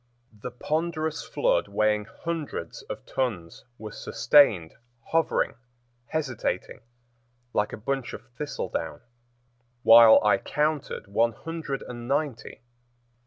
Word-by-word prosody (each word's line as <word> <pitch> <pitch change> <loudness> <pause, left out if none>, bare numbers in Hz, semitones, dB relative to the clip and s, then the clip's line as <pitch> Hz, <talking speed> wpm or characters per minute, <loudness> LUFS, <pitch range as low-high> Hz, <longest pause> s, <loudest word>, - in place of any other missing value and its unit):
The 125 - -4
ponderous 155 +4 -2
flood, - - +1
weighing 105 -1 +1
hundreds 155 - -5
of - - -6
tons, 100 -11 -3
was 110 -1 -9
sustained, 105 - +4 0.4
hovering, 165 0 +1 0.5
hesitating, 145 -7 -3 0.7
like 105 - +1
a - - -6
bunch 135 +3 -3
of - - -9
thistledown, 150 -4 -4 0.8
while 115 -1 +9
I 105 -2 +4
counted 150 -4 -1
one 115 +4 +1
hundred 160 -3 -5
and 120 -1 -8
ninety. 140 -6 -2
130 Hz, 105 wpm, -26 LUFS, 110-155 Hz, 0.8 s, while